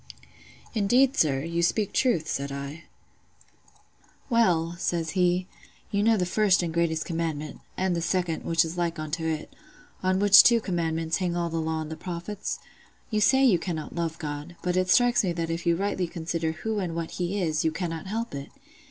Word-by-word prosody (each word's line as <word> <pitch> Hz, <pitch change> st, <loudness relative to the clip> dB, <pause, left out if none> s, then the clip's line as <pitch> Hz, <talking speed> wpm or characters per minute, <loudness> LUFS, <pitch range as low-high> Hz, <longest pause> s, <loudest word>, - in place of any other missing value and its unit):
"'Indeed, 245 Hz, +6 st, +3 dB
sir, 135 Hz, -4 st, +2 dB
you 170 Hz, +1 st, -1 dB
speak 200 Hz, +4 st, +1 dB
truth,' 220 Hz, -12 st, +2 dB
said 140 Hz, -1 st, -3 dB
I. 140 Hz, +4 st, -6 dB, 1.5 s
"'Well,' 175 Hz, -8 st, +2 dB
says 165 Hz, -2 st, -1 dB
he, 180 Hz, +1 st, +2 dB, 0.5 s
'you 200 Hz, -, +1 dB
know 225 Hz, +1 st, +4 dB
the 180 Hz, -, +1 dB
first 190 Hz, 0 st, +3 dB
and 165 Hz, -2 st, -3 dB
great 165 Hz, -1 st, 0 dB
commandment—and 165 Hz, +2 st, -3 dB
the 170 Hz, -, -1 dB
second, 175 Hz, -1 st, -1 dB
which 165 Hz, 0 st, +2 dB
is 165 Hz, +2 st, -5 dB
like 170 Hz, -1 st, -1 dB
unto 155 Hz, +2 st, -3 dB
it—on 185 Hz, -, -4 dB
which 200 Hz, 0 st, +9 dB
two 235 Hz, -1 st, +5 dB
commandments 165 Hz, -4 st, -1 dB
hang 180 Hz, -2 st, -1 dB
all 170 Hz, -1 st, -1 dB
the 165 Hz, 0 st, -1 dB
law 160 Hz, 0 st, -2 dB
and 155 Hz, 0 st, -6 dB
the -, -, -4 dB
prophets? 180 Hz, +5 st, -5 dB, 0.5 s
You 215 Hz, -1 st, +1 dB
say 265 Hz, +6 st, +5 dB
you 200 Hz, -9 st, +4 dB
cannot 160 Hz, -3 st, -4 dB
love 165 Hz, -1 st, -2 dB
God; 150 Hz, +1 st, -6 dB
but 180 Hz, -1 st, 0 dB
it 185 Hz, 0 st, +1 dB
strikes 245 Hz, +4 st, +4 dB
me 180 Hz, -3 st, 0 dB
that 165 Hz, -1 st, -2 dB
if 165 Hz, +1 st, -3 dB
you 170 Hz, -, +4 dB
rightly 190 Hz, -1 st, -1 dB
consider 165 Hz, -1 st, -3 dB
who 215 Hz, +6 st, -3 dB
and 175 Hz, -4 st, -3 dB
what 165 Hz, -1 st, -4 dB
He 180 Hz, +3 st, -2 dB
is, 155 Hz, -4 st, 0 dB
you 160 Hz, -, +2 dB
cannot 165 Hz, 0 st, -4 dB
help 225 Hz, +4 st, -3 dB
it. 140 Hz, 0 st, -6 dB
170 Hz, 185 wpm, -26 LUFS, 160-195 Hz, 1.5 s, which